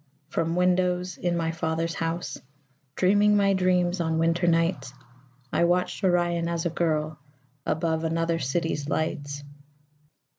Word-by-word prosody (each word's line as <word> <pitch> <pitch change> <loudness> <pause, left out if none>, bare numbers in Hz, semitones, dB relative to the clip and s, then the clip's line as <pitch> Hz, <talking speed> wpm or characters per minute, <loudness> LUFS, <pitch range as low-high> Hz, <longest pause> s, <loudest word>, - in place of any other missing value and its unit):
From 165 +1 -1
windows 180 0 +1
in 175 -1 -1
my 165 -1 0
father's 165 0 -2
house, 165 -3 -3 0.6
Dreaming 205 +2 +4
my 200 -1 +3
dreams 180 -1 +2
on 160 -1 0
winter 165 +2 +1
nights, 165 -4 +1 0.6
I 170 - +3
watched 180 +3 0
Orion 175 -2 +2
as 170 0 -2
a 170 - 0
girl 155 -2 -1 0.5
Above 160 0 0
another 165 +1 0
city's 150 +1 -2
lights. 145 -2 -2
170 Hz, 125 wpm, -26 LUFS, 160-180 Hz, 0.6 s, Dreaming